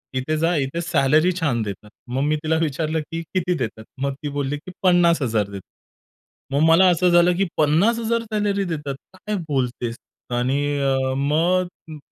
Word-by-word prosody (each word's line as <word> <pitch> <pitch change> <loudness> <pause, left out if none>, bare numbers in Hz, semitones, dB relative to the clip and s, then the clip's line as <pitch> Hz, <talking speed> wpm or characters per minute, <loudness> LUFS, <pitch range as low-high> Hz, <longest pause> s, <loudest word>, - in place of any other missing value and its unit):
इथे 155 +5 -1
जा, 165 +2 +1
इथे 145 +3 -1
सॅलरी 155 +1 +3
छान 130 -8 0
देतात." 105 +1 -7 0.2
मग 130 +2 -1
मी 150 +1 +2
तिला 160 +1 +1
विचारलं, 155 +1 -1
की 165 0 -3
"किती 180 -1 +1
देतात?" 110 -4 -4 0.2
मग 140 0 0
ती 145 - -2
बोलली, 140 +1 -1
की 160 +5 -11
"50,000 165 - +3
देतात." 100 -2 -9 0.8
मग 140 - +2
मला 185 +3 +6
असं 180 +1 +3
झालं, 175 +1 +5
की 195 - +2
"50,000 225 +10 +2
सॅलरी 205 -1 +1
देतात, 150 -6 -4 0.2
काय 210 +3 -4
बोलतेस?" 125 -4 -2 0.4
आणि 130 +3 0 0.2
अ, 135 -1 +1
मग 170 +6 +2 0.3
म - - -8
155 Hz, 165 wpm, -22 LUFS, 135-175 Hz, 0.8 s, मला